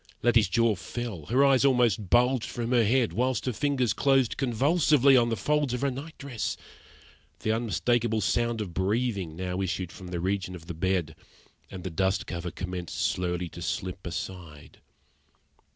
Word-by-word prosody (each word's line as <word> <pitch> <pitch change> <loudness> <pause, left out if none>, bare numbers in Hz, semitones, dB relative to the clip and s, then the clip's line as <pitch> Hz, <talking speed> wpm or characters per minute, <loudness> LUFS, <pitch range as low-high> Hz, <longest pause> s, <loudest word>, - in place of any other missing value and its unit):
Letty's 115 -4 +4
jaw 115 +3 +3
fell, 105 -6 -6
her 135 +7 +4
eyes 135 -2 +4
almost 120 -8 +2
bulged 125 0 +3
from 120 0 -3
her 120 -2 +4
head, 120 +2 +2
whilst 125 -1 0
her 125 - -1
fingers 130 -3 +1
closed 135 -3 +2
convulsively 140 +2 +3
on 120 -2 +4
the 115 - -1
folds 145 +4 0
of 125 - -4
her 140 -1 +1
night 145 +5 -8
dress. 135 -7 -4 0.8
The 110 - 0
unmistakable 115 0 0
sound 120 +3 0
of 95 -5 -5
breathing 100 -3 -1
now 90 +1 -3
issued 95 -2 -2
from 95 - -10
the 90 -1 -4
region 95 0 -2
of 85 -2 -11
the 85 - -6
bed, 85 -2 -1 0.5
and 95 -2 -8
the 95 - -4
dust 95 +3 0
cover 85 0 -4
commenced 90 -1 -5
slowly 90 -1 -1
to 85 - -10
slip 90 +3 -4
aside. 80 -3 -7
110 Hz, 170 wpm, -27 LUFS, 90-125 Hz, 0.8 s, Letty's